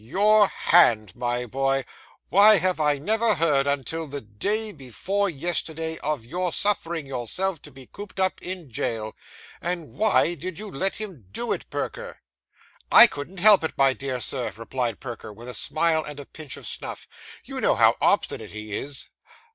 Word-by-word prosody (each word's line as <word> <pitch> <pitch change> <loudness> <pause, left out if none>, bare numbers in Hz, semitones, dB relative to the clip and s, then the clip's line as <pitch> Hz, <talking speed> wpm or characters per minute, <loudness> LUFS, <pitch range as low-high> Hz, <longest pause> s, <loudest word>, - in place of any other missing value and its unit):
'Your 205 - +4
hand, 110 - +3
my 120 0 -2
boy! 135 +2 -1 0.4
Why 210 +2 +7
have 185 -1 0
I 150 -2 +2
never 220 +8 +1
heard 150 -4 +2
until 145 +3 -2
the 140 0 -6
day 205 - -2
before 190 - -2
yesterday 160 0 -2
of 150 -6 -3
your 180 +7 -2
suffering 170 -5 0
yourself 145 - -3
to 150 - -13
be 130 -1 -13
cooped 200 +4 -10
up 190 0 0
in 180 -7 -5
jail? 110 -1 -3 0.5
And 175 -3 -4
why 210 -5 +2
did 175 +1 -7
you 210 0 -6
let 190 +7 -1
him 185 - -5
do 240 - -3
it, - - -7
Perker?' - - -5 0.7
'I - - +11
couldn't 175 -1 -5
help 205 -4 +7
it, 160 - -3
my 135 -1 +4
dear 130 -1 -4
Sir,' 125 0 -2
replied 115 -1 -3
Perker, 120 -4 -8
with 115 +4 -12
a 125 - -5
smile 160 +6 +1
and 150 -1 -7
a 140 - -7
pinch 155 -2 -8
of - - -11
snuff; - - -5 0.4
'you - - -6
know - - +3
how - - +5
obstinate - - +1
he 105 -1 -7
is? 140 -1 -6
155 Hz, 170 wpm, -24 LUFS, 130-190 Hz, 0.7 s, I